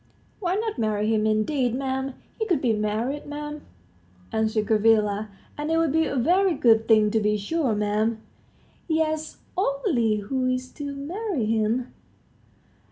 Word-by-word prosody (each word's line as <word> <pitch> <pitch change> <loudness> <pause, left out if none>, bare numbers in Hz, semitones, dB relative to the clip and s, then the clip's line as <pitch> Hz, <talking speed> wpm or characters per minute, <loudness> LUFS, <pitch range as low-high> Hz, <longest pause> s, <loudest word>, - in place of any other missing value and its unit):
"Why 365 -2 0
not 435 - -2
marry 215 0 +1
him, 215 0 +2
indeed, 245 +3 +1
'm? 265 0 -2 0.2
He 440 - -1
could 350 -8 +2
be 245 -5 +2
married, 225 +8 -2
'm," 295 0 -5 0.7
answered 220 -1 0
Gavrila, 215 -1 +2 0.3
"and 300 +1 -2
it 325 - +2
would 325 -3 +2
be 320 +2 +2
a - - -3
very 355 +8 +3
good 225 -4 +4
thing, 215 -2 +5
to 220 - +2
be 210 0 +1
sure, 235 0 -1
'm." 210 +2 +1 0.7
"Yes; 315 -1 -1 0.2
only 275 - +1
who 255 +5 -1
is 255 0 -2
to 285 -1 -6
marry 335 - -3
him?" 225 +3 0
255 Hz, 150 wpm, -25 LUFS, 215-300 Hz, 0.7 s, thing